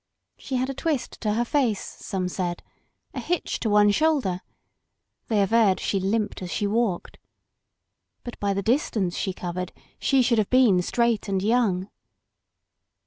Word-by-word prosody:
She 265 Hz, -, -5 dB
had 255 Hz, +1 st, +1 dB
a 275 Hz, -, -3 dB
twist 290 Hz, -1 st, -3 dB
to 210 Hz, -2 st, 0 dB
her 235 Hz, +2 st, +1 dB
face, 240 Hz, -6 st, +1 dB
some 185 Hz, -2 st, -4 dB
said; 175 Hz, -1 st, -3 dB, 0.5 s
a -, -, -4 dB
hitch 355 Hz, -1 st, -2 dB
to 225 Hz, -, -1 dB
one 205 Hz, 0 st, +5 dB
shoulder; 265 Hz, -, +1 dB, 0.9 s
they 210 Hz, -3 st, +2 dB
averred 200 Hz, -2 st, +3 dB
she 195 Hz, -, 0 dB
limped 205 Hz, +2 st, -1 dB
as 180 Hz, -, -5 dB
she 205 Hz, -, -1 dB
walked. 210 Hz, -3 st, -1 dB, 1.0 s
But 240 Hz, -, -8 dB
by 200 Hz, -1 st, 0 dB
the 200 Hz, -, -1 dB
distance 215 Hz, -6 st, 0 dB
she 190 Hz, -, -1 dB
covered 180 Hz, 0 st, -5 dB, 0.3 s
she 270 Hz, -2 st, +3 dB
should 235 Hz, -2 st, +3 dB
have 210 Hz, -, 0 dB
been 245 Hz, -8 st, +5 dB
straight 235 Hz, +3 st, 0 dB
and 190 Hz, -1 st, 0 dB
young. 205 Hz, -5 st, +1 dB
210 Hz, 155 wpm, -25 LUFS, 190-240 Hz, 1.0 s, one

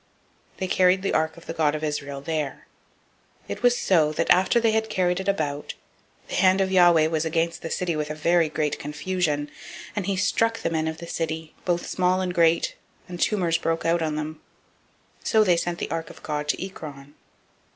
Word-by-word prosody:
They 190 Hz, -, -2 dB
carried 185 Hz, +1 st, +3 dB
the 195 Hz, -, 0 dB
ark 160 Hz, +1 st, 0 dB
of 170 Hz, -, -14 dB
the -, -, -5 dB
God 155 Hz, -2 st, +1 dB
of 155 Hz, -, -5 dB
Israel 145 Hz, -2 st, -3 dB
[there]. 150 Hz, -2 st, -3 dB, 0.8 s
005:009 -, -, -28 dB
It -, -, -5 dB
was 245 Hz, 0 st, +4 dB
so, 160 Hz, -5 st, +3 dB
that -, -, +1 dB
after 185 Hz, +6 st, +4 dB
they 225 Hz, -1 st, +3 dB
had 220 Hz, 0 st, 0 dB
carried 180 Hz, -2 st, +1 dB
it 190 Hz, -, -5 dB
about, 150 Hz, -7 st, -2 dB, 0.5 s
the -, -, -8 dB
hand 185 Hz, 0 st, +4 dB
of 190 Hz, -1 st, +1 dB
Yahweh 175 Hz, -4 st, +6 dB
was 160 Hz, -1 st, 0 dB
against 165 Hz, +1 st, -1 dB
the 165 Hz, -, -5 dB
city 180 Hz, -2 st, -1 dB
with 150 Hz, -1 st, -2 dB
a 155 Hz, -, -4 dB
very 165 Hz, +1 st, +2 dB
great 150 Hz, -1 st, -1 dB
confusion: 150 Hz, -1 st, -2 dB, 0.4 s
and 205 Hz, -3 st, -2 dB
he 200 Hz, -, +1 dB
struck 225 Hz, +3 st, +1 dB
the 165 Hz, -, -2 dB
men 160 Hz, -1 st, 0 dB
of 160 Hz, 0 st, -3 dB
the 170 Hz, -, -8 dB
city, 160 Hz, -1 st, -4 dB
both 175 Hz, -1 st, 0 dB
small 185 Hz, 0 st, +1 dB
and 185 Hz, -1 st, -2 dB
great; 170 Hz, -1 st, +3 dB, 0.3 s
and 175 Hz, -1 st, -7 dB
tumors 175 Hz, -6 st, +1 dB
broke 165 Hz, -1 st, -1 dB
out 170 Hz, +1 st, +2 dB
on 155 Hz, -2 st, -1 dB
them. 155 Hz, +1 st, -5 dB, 0.8 s
005:010 -, -, -8 dB
So 220 Hz, -1 st, +5 dB
they 180 Hz, -4 st, +4 dB
sent 175 Hz, 0 st, -2 dB
the -, -, -4 dB
ark 165 Hz, 0 st, -3 dB
of -, -, -14 dB
God 150 Hz, -1 st, -3 dB
to 150 Hz, -, -1 dB
Ekron. 145 Hz, -6 st, -10 dB
165 Hz, 210 wpm, -25 LUFS, 155-185 Hz, 0.8 s, Yahweh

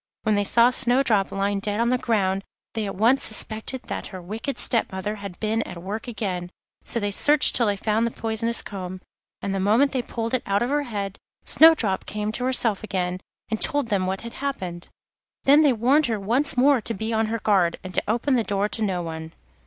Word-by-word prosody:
When 215 Hz, -, +1 dB
they 205 Hz, 0 st, +2 dB
saw 235 Hz, +4 st, +4 dB
Snowdrop 245 Hz, -5 st, +2 dB
lying 200 Hz, 0 st, -1 dB
dead 205 Hz, +1 st, -2 dB
on 235 Hz, +1 st, +2 dB
the 255 Hz, -, +2 dB
ground, 195 Hz, -5 st, 0 dB, 0.3 s
they 220 Hz, -2 st, -2 dB
at 195 Hz, -, -5 dB
once 230 Hz, +7 st, +3 dB
suspected 220 Hz, +3 st, +1 dB
that -, -, -5 dB
her 185 Hz, -, -8 dB
wicked 220 Hz, +10 st, -5 dB
step 230 Hz, -3 st, +2 dB
mother 190 Hz, +3 st, -4 dB
had 200 Hz, -3 st, -9 dB
been 220 Hz, +1 st, 0 dB
at 180 Hz, -, -7 dB
work 215 Hz, +5 st, -5 dB
again; 185 Hz, -6 st, -4 dB, 0.3 s
so 235 Hz, -, -2 dB
they 205 Hz, -2 st, -2 dB
searched 290 Hz, +8 st, +5 dB
till 235 Hz, -, +3 dB
they 205 Hz, -, +1 dB
found 220 Hz, +3 st, 0 dB
the -, -, -1 dB
poisonous 230 Hz, +1 st, -2 dB
comb, 185 Hz, -2 st, -7 dB, 0.4 s
and 195 Hz, -, -2 dB
the 195 Hz, -, -1 dB
moment 225 Hz, +9 st, +3 dB
they 260 Hz, -, -1 dB
pulled 230 Hz, -1 st, -5 dB
it 255 Hz, -, +1 dB
out 200 Hz, +3 st, +1 dB
of 245 Hz, -, -2 dB
her 295 Hz, 0 st, +1 dB
head 200 Hz, -3 st, -4 dB, 0.3 s
Snowdrop 275 Hz, -12 st, +4 dB
came 210 Hz, 0 st, -3 dB
to 245 Hz, +3 st, -3 dB
herself 235 Hz, -5 st, +1 dB
again, 185 Hz, -3 st, -2 dB, 0.3 s
and 220 Hz, -, -2 dB
told 290 Hz, -6 st, +2 dB
them 190 Hz, -3 st, 0 dB
what 190 Hz, +1 st, -3 dB
had 235 Hz, 0 st, -8 dB
happened. 185 Hz, -11 st, -5 dB, 0.5 s
Then 285 Hz, +3 st, +6 dB
they 295 Hz, -3 st, +5 dB
warned 260 Hz, +6 st, +2 dB
her 225 Hz, -3 st, -2 dB
once 245 Hz, +8 st, +1 dB
more 270 Hz, 0 st, +4 dB
to 230 Hz, -, -4 dB
be 220 Hz, +3 st, -3 dB
on 220 Hz, 0 st, +1 dB
her 225 Hz, +1 st, -2 dB
guard, 190 Hz, -6 st, +1 dB
and 185 Hz, 0 st, -8 dB
to -, -, +1 dB
open 240 Hz, +6 st, 0 dB
the 240 Hz, -3 st, +2 dB
door 200 Hz, -1 st, -1 dB
to 225 Hz, -, -3 dB
no 185 Hz, -4 st, -1 dB
one. 160 Hz, -1 st, -7 dB
220 Hz, 220 wpm, -24 LUFS, 195-240 Hz, 0.5 s, Then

